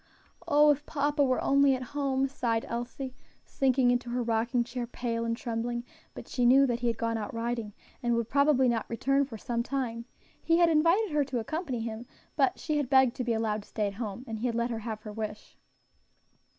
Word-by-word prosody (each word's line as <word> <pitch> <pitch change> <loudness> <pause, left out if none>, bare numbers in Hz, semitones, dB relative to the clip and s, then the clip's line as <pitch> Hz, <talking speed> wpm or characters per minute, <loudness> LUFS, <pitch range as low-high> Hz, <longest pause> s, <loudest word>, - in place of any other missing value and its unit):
"Oh! 295 -1 +6
if 290 0 -1
papa 290 0 +1
was 255 -2 +2
only 275 -1 +4
at 255 - -5
home," 275 -2 +1
sighed 235 -4 -1
Elsie, 245 +2 -5 0.3
sinking 260 -3 +2
into 245 0 -1
her 245 0 -1
rocking 235 +2 +1
chair, 240 0 -5
pale 230 -1 -3
and 230 0 -1
trembling; 235 0 -3 0.3
but - - -9
she 250 - -1
knew 265 +3 +6
that 240 -3 -1
he 240 - -1
had 230 -2 0
gone 230 -1 -1
out 210 - -5
riding, 230 -2 -2 0.3
and 240 -1 +1
would 235 -1 -1
probably 280 -1 +3
not 235 -2 0
return 275 +4 +1
for 240 -5 -9
some 235 +2 -2
time; 235 -3 -3 0.4
he 330 0 +3
had 340 -1 +5
invited 335 +6 +3
her 295 -1 +2
to 260 -2 -3
accompany 260 +1 -3
him, 225 +1 -5 0.3
but 270 -4 +2
she 305 -2 -2
had 285 -4 -1
begged 265 -2 +5
to 255 - -1
be 235 -1 0
allowed 220 -1 -1
to - - -19
stay 215 - -1
at 200 - -2
home, 220 +3 -5
and 220 -1 -5
he 245 - 0
had 235 - -2
let 235 +1 0
her 225 - -3
have 220 -1 -5
her 210 - -7
wish. 215 -1 -6
245 Hz, 215 wpm, -29 LUFS, 230-275 Hz, 0.4 s, Oh